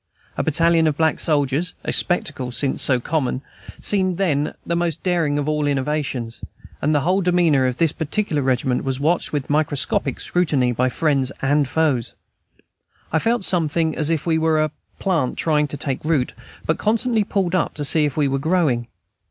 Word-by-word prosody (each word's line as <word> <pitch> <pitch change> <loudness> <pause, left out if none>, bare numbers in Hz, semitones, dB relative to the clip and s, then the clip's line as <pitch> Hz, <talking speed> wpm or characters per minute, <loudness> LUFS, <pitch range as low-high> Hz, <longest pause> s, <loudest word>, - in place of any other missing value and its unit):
A - - 0
battalion 165 +1 +3
of 150 -2 0
black 160 -1 +1
soldiers, 145 +1 0
a - - -1
spectacle 145 -7 0
since 130 +2 -1
so 130 -3 +3
common, 135 -1 -2 0.4
seemed 185 -3 +1
then 155 -6 0
the 170 - -1
most 170 -2 -2
daring 170 -6 +1
of 145 0 -2
innovations, 145 -5 -1 0.4
and 150 +2 +1
the 145 - +2
whole 185 +6 +1
demeanor 170 -7 +3
of 125 -1 -2
this 165 -3 +3
particular 160 -1 -1
regiment 130 -1 0
was 135 -1 -2
watched 165 +4 +1
with 145 -3 -2
microscopic 145 -2 0
scrutiny 150 -8 +1
by 125 +2 +1
friends 135 -2 0
and 145 +1 +2
foes. 145 -6 0 1.0
I 160 - +3
felt 230 +4 0
sometimes 165 -3 0
as 155 -1 0
if 165 -3 -1
we 160 -2 +2
were 160 -1 +2
a 155 - -2 0.3
plant 165 -10 0
trying 150 -2 +1
to 145 - -6
take 135 -2 -2
root, 150 -5 0 0.3
but 160 - 0
constantly 225 +1 +1
pulled 195 -3 -1
up 185 - 0
to 145 - -2
see 155 +2 +3
if 145 -2 -1
we 145 -2 +2
were 135 0 -1
growing. 150 -7 +1
150 Hz, 175 wpm, -21 LUFS, 140-170 Hz, 1.0 s, battalion